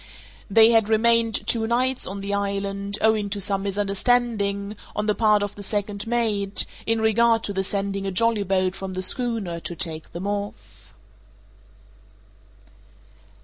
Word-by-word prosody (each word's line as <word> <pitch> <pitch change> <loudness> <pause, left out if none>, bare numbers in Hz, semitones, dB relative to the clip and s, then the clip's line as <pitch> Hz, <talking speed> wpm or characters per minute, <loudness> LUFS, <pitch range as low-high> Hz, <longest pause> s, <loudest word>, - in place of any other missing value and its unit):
They 225 +3 +6
had 225 -2 +3
remained 230 0 +2
two 225 -1 +1
nights 255 +2 +1
on 195 +1 -6
the 200 +1 -4
island, 200 0 -2
owing 220 -2 +2
to 200 0 -3
some 195 0 -1
misunderstanding, 200 +1 0 0.2
on 210 - -1
the 210 - +2
part 210 -1 +3
of 205 - -4
the 205 - -10
second 205 +1 -3
mate, 210 -4 +1 0.2
in 225 0 +1
regard 225 +1 +3
to 200 - -3
the 190 0 -1
sending 195 0 -2
a - - -2
jollyboat 195 -3 +1
from 190 0 -6
the 185 - -3
schooner 220 -7 -2
to 175 - -6
take 160 -3 -1
them 175 +3 -6
off. 205 0 -6
205 Hz, 145 wpm, -23 LUFS, 195-225 Hz, 0.2 s, They